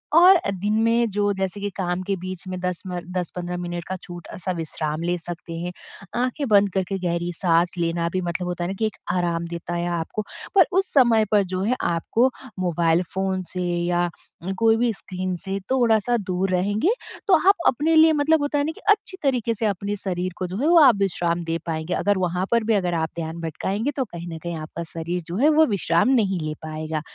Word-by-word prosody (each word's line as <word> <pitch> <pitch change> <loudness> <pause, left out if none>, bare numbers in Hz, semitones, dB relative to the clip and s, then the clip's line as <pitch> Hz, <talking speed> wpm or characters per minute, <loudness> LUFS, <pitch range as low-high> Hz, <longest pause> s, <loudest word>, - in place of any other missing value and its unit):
और 360 +3 +9
अ, 340 - 0
दिन 200 +2 -1
में 230 0 +3
जो 205 0 +1
जैसे 190 +1 -3
कि 205 - -1
काम 180 -1 -1
के 195 +1 -1
बीच 185 0 -6
में 185 0 -4
10 180 -1 -2
मर 180 -1 -4
10-15 180 0 -3
मिनट 175 -1 -4
का 190 - -3
छोटा-सा 175 0 -6
विश्राम 155 -2 -3
ले 175 +1 0
सकते 170 0 -7
हैं। 175 +1 -3 0.5
आँखें 255 +3 -1
बंद 205 -1 +5
करके 195 0 -1
गहरी 175 -1 -1
साँस 170 0 +2
लेना 170 0 0
भी 185 - 0
मतलब 175 0 -3
होता 175 -1 -3
है 175 - -2
ना - - -2
कि 220 - +2
एक 215 - -3 0.2
आराम 170 -2 0
देता 170 0 -5
है 175 0 -1
आपको 170 +4 -2 0.3
पर 375 -3 +8
उस 380 +1 +1
समय 235 -5 +5
पर 205 -2 +5
जो 185 - -1
है 235 +5 +1
आपको 175 +9 +2 0.3
मोबाइल 170 -1 +2
फ़ोन 190 0 -1
से 180 -1 -2
या 175 0 0 0.3
उम, 190 +2 -2
कोई 225 +2 +3
भी 240 0 +2
स्क्रीन 185 -2 -4
से 195 +1 -2
थोड़ा-सा 240 -2 +3
दूर 190 -2 -1
रहेंगे 205 - +1 0.4
तो 390 - +4 0.2
आप 400 - +7
अपने 305 +6 +3
लिए 320 0 +7
मतलब 305 +1 +3
होता 290 0 0
है - - +2
ना 315 - -1
कि - - -14
अच्छी 405 -2 0
तरीके 250 -5 +1
से 225 - -2
अपने 200 0 -1
शरीर 185 -2 -3
को 185 - -2
जो 185 +2 -5
है 295 - +2
वो 340 0 +7
आप 270 -7 +7
विश्राम 175 -3 0
दे 165 0 -1
पाएँगे 160 +1 -2
अगर 205 -1 +1
वहाँ 180 0 0
पर 235 -1 +3
भी 225 - +2
अगर 180 -3 0
आप 160 -1 0
ध्यान 165 0 -5
भटकाएँगे 195 - -2
तो 265 - +1
कहीं 170 -5 -8
न - - -7
कहीं 170 -1 -3
आपका 155 +2 -6
शरीर 170 +2 -3
जो 175 - -4
है 285 +7 +5
वो 315 +1 +5
विश्राम 185 -2 +2
नहीं 195 -7 +2
ले 155 0 -3
पाएगा। 155 0 -4
185 Hz, 220 wpm, -23 LUFS, 175-220 Hz, 0.5 s, और